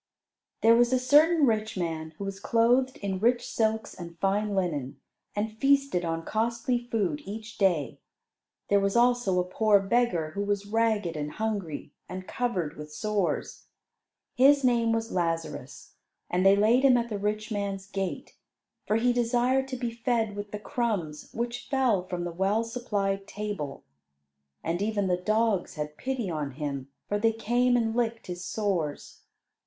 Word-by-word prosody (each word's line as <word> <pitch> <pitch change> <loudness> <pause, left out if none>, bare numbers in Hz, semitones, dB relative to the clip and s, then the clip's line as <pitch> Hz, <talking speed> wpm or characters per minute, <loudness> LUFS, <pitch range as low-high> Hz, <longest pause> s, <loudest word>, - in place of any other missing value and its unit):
There 225 +1 +7
was 240 +1 +4
a 260 - +4
certain 295 +5 +5
rich 220 -3 0
man 160 -2 -3
who - - -5
was 195 0 -5
clothed 245 +5 +2
in 190 -2 -2
rich 240 +3 +2
silks 220 0 0
and 170 -1 -9
fine 200 +3 0
linen, 150 -9 -2 0.4
and 215 +1 -2
feasted 275 -9 +3
on 165 -1 -2
costly 235 +2 0
food 185 -11 0
each 220 +3 -8
day. 170 - +1 0.7
There 200 - +5
was 195 +1 0
also 240 -6 +3
a - - +2
poor 205 +3 +3
beggar, 195 -6 +1
who 200 - -3
was 205 0 -1
ragged 215 -5 +1
and 150 0 -4
hungry, 200 -10 -3 0.2
and 185 +1 -6
covered 195 -11 -2
with 150 0 -8
sores. 210 +2 -2 0.7
His 275 +2 +5
name 235 -2 +3
was 225 0 -1
Lazarus, 165 -2 -3 0.4
and 180 +1 +2
they 195 +1 +7
laid 220 +5 +4
him 260 -3 +6
at 235 0 -1
the 205 -2 -3
rich 215 +2 -2
man's 200 -2 -3
gate, 195 -2 -4 0.5
for 210 - +2
he 245 +2 +3
desired 245 +2 +2
to 260 -1 -4
be 240 -1 -2
fed 230 -2 -1
with 205 0 -5
the 210 - -5
crumbs 205 - -3
which 235 +1 -4
fell 245 -10 +2
from 180 -1 -3
the 175 - -3
well 195 +6 +1
supplied 205 -5 -2
table. 205 -9 -5 0.8
And 170 +3 -1
even 205 -1 0
the 180 -1 +1
dogs 215 -1 +1
had 150 -1 -4
pity 255 +1 -3
on 150 -5 -3
him, 140 -2 -4 0.2
for 205 - 0
they 225 +1 +3
came 245 +3 +2
and 225 -1 0
licked 230 -1 -1
his 180 0 -6
sores. 180 -9 -2
210 Hz, 165 wpm, -28 LUFS, 180-235 Hz, 0.8 s, There